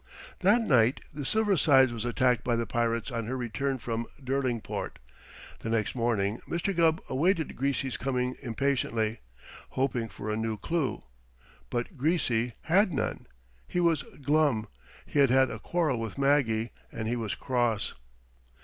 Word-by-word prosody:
That 205 Hz, +6 st, +4 dB
night 125 Hz, -, +3 dB
the 145 Hz, 0 st, -5 dB
Silver 210 Hz, +6 st, +2 dB
Sides 135 Hz, -5 st, +5 dB
was 115 Hz, 0 st, -4 dB
attacked 125 Hz, -2 st, +2 dB
by 120 Hz, -, +1 dB
the 115 Hz, 0 st, 0 dB
pirates 115 Hz, +2 st, -1 dB
on 115 Hz, -2 st, -3 dB
her 130 Hz, +2 st, -2 dB
return 130 Hz, +3 st, -2 dB
from 115 Hz, -1 st, -3 dB
Derlingport. 130 Hz, -3 st, -2 dB, 0.6 s
The 115 Hz, -, -5 dB
next 115 Hz, -2 st, 0 dB
morning 115 Hz, -4 st, 0 dB
Mr. 175 Hz, +3 st, -1 dB
Gubb 165 Hz, 0 st, +3 dB
awaited 165 Hz, +4 st, +1 dB
Greasy's 135 Hz, -1 st, -1 dB
coming 125 Hz, -1 st, -1 dB
impatiently, 115 Hz, -3 st, 0 dB, 0.5 s
hoping 125 Hz, -4 st, -1 dB
for 105 Hz, +2 st, -5 dB
a -, -, 0 dB
new 110 Hz, 0 st, -2 dB
clue, 155 Hz, -, -1 dB, 0.7 s
but 120 Hz, +7 st, -3 dB
Greasy 125 Hz, -6 st, +1 dB
had 190 Hz, +4 st, +3 dB
none. 140 Hz, -, -2 dB, 0.4 s
He 180 Hz, -, -1 dB
was 165 Hz, -4 st, +3 dB, 0.2 s
glum. 145 Hz, -6 st, +2 dB, 0.4 s
He 145 Hz, -, -1 dB
had 140 Hz, -2 st, +6 dB
had 130 Hz, +1 st, +4 dB
a -, -, -6 dB
quarrel 160 Hz, -8 st, 0 dB
with 115 Hz, +1 st, -5 dB
Maggie, 135 Hz, -5 st, +2 dB, 0.2 s
and 110 Hz, -1 st, -4 dB
he 120 Hz, -, 0 dB
was 115 Hz, -4 st, -2 dB
cross. 120 Hz, -5 st, 0 dB
130 Hz, 150 wpm, -29 LUFS, 115-145 Hz, 0.7 s, had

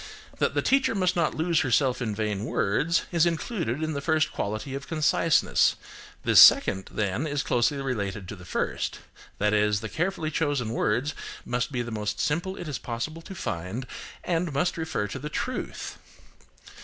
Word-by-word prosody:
That -, -, +1 dB
the -, -, +1 dB
teacher 270 Hz, -3 st, +3 dB
must 185 Hz, -2 st, +1 dB
not 170 Hz, -3 st, +1 dB
lose 160 Hz, 0 st, +2 dB
herself 130 Hz, -1 st, +2 dB
in 110 Hz, -4 st, -2 dB
vain 105 Hz, -2 st, -2 dB
words, 150 Hz, +10 st, +1 dB
is 170 Hz, -1 st, +4 dB
included 165 Hz, -, -2 dB
in 155 Hz, 0 st, -1 dB
the 140 Hz, -, -3 dB
first 155 Hz, +1 st, +1 dB
quality 110 Hz, +6 st, -3 dB
of 140 Hz, +1 st, -5 dB
conciseness; 160 Hz, 0 st, +3 dB, 0.5 s
this -, -, +7 dB
second, 95 Hz, 0 st, +6 dB
then, 105 Hz, +7 st, -1 dB
is 145 Hz, -1 st, -1 dB
closely 125 Hz, +3 st, +1 dB
related 100 Hz, -8 st, -3 dB
to -, -, -5 dB
the 90 Hz, -, -13 dB
first: 90 Hz, -, -2 dB, 0.4 s
that 105 Hz, +1 st, +1 dB
is, 105 Hz, 0 st, +3 dB
the 110 Hz, 0 st, -6 dB
carefully 170 Hz, -, -1 dB
chosen 145 Hz, -7 st, 0 dB
words 125 Hz, +4 st, 0 dB, 0.3 s
must 120 Hz, +2 st, -1 dB
be 125 Hz, -3 st, -1 dB
the 120 Hz, -, -6 dB
most 105 Hz, -1 st, -3 dB
simple 175 Hz, +6 st, -1 dB
it 175 Hz, -, -6 dB
is 145 Hz, -4 st, -3 dB
possible 125 Hz, +8 st, -4 dB
to 190 Hz, -, -9 dB
find, 95 Hz, -, -4 dB, 0.4 s
and 170 Hz, -1 st, 0 dB
must 170 Hz, +6 st, 0 dB
refer 160 Hz, -10 st, -2 dB
to -, -, -6 dB
the 150 Hz, -, -5 dB
truth. 255 Hz, +11 st, -4 dB
140 Hz, 175 wpm, -27 LUFS, 110-165 Hz, 0.5 s, this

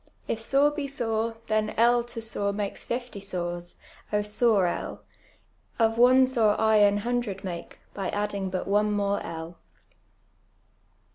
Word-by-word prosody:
If 225 Hz, -, -1 dB
sore 275 Hz, +6 st, +3 dB
be 295 Hz, -1 st, -3 dB
.sore, 225 Hz, -4 st, -2 dB
llien 215 Hz, 0 st, 0 dB
L 240 Hz, +1 st, +4 dB
to 240 Hz, -1 st, -6 dB
sore 205 Hz, -2 st, -1 dB
makes 200 Hz, -1 st, -4 dB
fifty 240 Hz, -3 st, -4 dB
sores, 175 Hz, -3 st, -4 dB, 0.2 s
() 210 Hz, 0 st, -2 dB
.sore 210 Hz, -2 st, +2 dB
L! 175 Hz, -, -3 dB, 0.7 s
Of 225 Hz, 0 st, +2 dB
one 255 Hz, +2 st, +7 dB
sore 230 Hz, -5 st, +2 dB
I 220 Hz, -1 st, +4 dB
aii 205 Hz, 0 st, +5 dB
hundred 240 Hz, -2 st, -2 dB
make, 175 Hz, -3 st, -6 dB, 0.2 s
by 195 Hz, -2 st, -3 dB
adding 205 Hz, -2 st, -2 dB
but 185 Hz, 0 st, -3 dB
one 210 Hz, +1 st, +2 dB
more 200 Hz, 0 st, 0 dB
L." 165 Hz, +1 st, -7 dB
215 Hz, 145 wpm, -27 LUFS, 200-235 Hz, 0.7 s, one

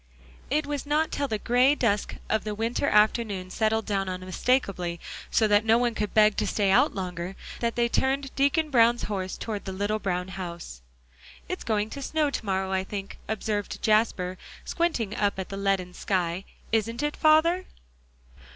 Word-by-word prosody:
It 295 Hz, +3 st, +1 dB
was 290 Hz, -1 st, -4 dB
not 305 Hz, +2 st, +1 dB
till 285 Hz, -, -1 dB
the 220 Hz, -, -1 dB
gray 250 Hz, +6 st, +3 dB
dusk 210 Hz, -7 st, 0 dB
of 220 Hz, -, 0 dB
the 210 Hz, -1 st, -3 dB
winter 230 Hz, +6 st, 0 dB
afternoon 210 Hz, -3 st, +2 dB
settled 220 Hz, +2 st, +1 dB
down 195 Hz, -2 st, -1 dB
unmistakably, 185 Hz, -1 st, -1 dB, 0.3 s
so 220 Hz, -, +3 dB
that 205 Hz, 0 st, +4 dB
no 225 Hz, +1 st, +4 dB
one 240 Hz, -1 st, +1 dB
could 210 Hz, -1 st, -2 dB
beg 215 Hz, -1 st, +5 dB
to 210 Hz, -, 0 dB
stay 200 Hz, 0 st, +1 dB
out -, -, +4 dB
longer, 180 Hz, -1 st, -4 dB, 0.2 s
that 235 Hz, -1 st, -1 dB
they 235 Hz, 0 st, +2 dB
turned 270 Hz, +3 st, 0 dB
Deacon 290 Hz, +3 st, +2 dB
Brown's 235 Hz, -1 st, +4 dB
horse 190 Hz, -3 st, -3 dB
toward 215 Hz, -3 st, -5 dB
the 190 Hz, -, -4 dB
little 205 Hz, +3 st, -1 dB
brown 180 Hz, -2 st, -2 dB
house. 170 Hz, -, -7 dB, 0.7 s
"It's -, -, -4 dB
going 215 Hz, -1 st, 0 dB
to 280 Hz, -, -6 dB
snow 300 Hz, +1 st, 0 dB
to -, -, -3 dB
morrow, 190 Hz, 0 st, 0 dB
I 190 Hz, 0 st, +1 dB
think," 195 Hz, 0 st, -6 dB
observed 210 Hz, -2 st, -2 dB
Jasper, 205 Hz, -4 st, +2 dB, 0.3 s
squinting 250 Hz, -, -1 dB
up 205 Hz, -1 st, 0 dB
at 190 Hz, -2 st, -5 dB
the 195 Hz, -, -5 dB
leaden 195 Hz, -2 st, 0 dB
sky, 180 Hz, -1 st, -1 dB, 0.3 s
"isn't 230 Hz, +4 st, 0 dB
it, 295 Hz, 0 st, -1 dB
father?" 335 Hz, +4 st, +4 dB
215 Hz, 175 wpm, -27 LUFS, 190-245 Hz, 0.7 s, beg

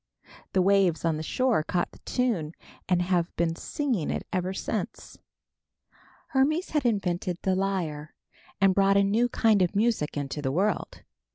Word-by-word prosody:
The 185 Hz, -, +3 dB
waves 190 Hz, -4 st, +3 dB
on 160 Hz, -2 st, +1 dB
the -, -, -4 dB
shore 250 Hz, +4 st, +1 dB
caught 175 Hz, +3 st, -1 dB
the -, -, -17 dB
tune 215 Hz, -12 st, -1 dB, 0.4 s
and 180 Hz, -1 st, +3 dB
have 175 Hz, -2 st, 0 dB
been 165 Hz, -1 st, 0 dB
singing 245 Hz, -, -2 dB
it -, -, -3 dB
ever 185 Hz, 0 st, -1 dB
since. 190 Hz, -, -5 dB, 1.1 s
Hermes 305 Hz, +7 st, +1 dB
had 300 Hz, -3 st, 0 dB
invented 180 Hz, -5 st, -1 dB
the 190 Hz, -, +2 dB
lyre 175 Hz, -6 st, -2 dB, 0.4 s
and 195 Hz, -1 st, +4 dB
brought 195 Hz, +1 st, +4 dB
a 200 Hz, -, +5 dB
new 220 Hz, +5 st, +2 dB
kind 220 Hz, -4 st, +3 dB
of 180 Hz, +2 st, +1 dB
music 210 Hz, -9 st, +1 dB
into 145 Hz, +1 st, -3 dB
the 130 Hz, -2 st, -1 dB
world. 195 Hz, +6 st, -1 dB
190 Hz, 160 wpm, -27 LUFS, 170-215 Hz, 1.1 s, a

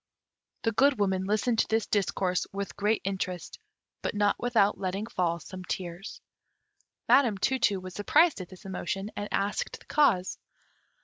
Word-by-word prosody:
The 225 Hz, -, +2 dB
Good 270 Hz, +5 st, +4 dB
Woman 190 Hz, -2 st, +1 dB
listened 215 Hz, +3 st, +1 dB
to -, -, +3 dB
this 225 Hz, 0 st, +1 dB
discourse 185 Hz, -3 st, 0 dB
with 200 Hz, 0 st, -5 dB
great 210 Hz, +2 st, +1 dB
interest; 185 Hz, -3 st, -4 dB, 0.4 s
but -, -, -3 dB
not 205 Hz, 0 st, +3 dB
without 225 Hz, -4 st, +2 dB
letting 195 Hz, +2 st, -2 dB
fall 175 Hz, -6 st, -1 dB
some 185 Hz, +3 st, -9 dB
tears. 180 Hz, +2 st, -5 dB, 0.9 s
Madam 240 Hz, -7 st, +5 dB
Tu 265 Hz, +7 st, +1 dB
tu 205 Hz, -5 st, +2 dB
was 185 Hz, 0 st, -8 dB
surprised 250 Hz, -, +3 dB
at 180 Hz, -, -9 dB
this 185 Hz, 0 st, -14 dB
emotion, 195 Hz, +2 st, -4 dB
and 205 Hz, 0 st, -4 dB
asked 200 Hz, +1 st, -1 dB
the -, -, -19 dB
cause. 215 Hz, -12 st, +2 dB
200 Hz, 160 wpm, -28 LUFS, 185-220 Hz, 0.9 s, Madam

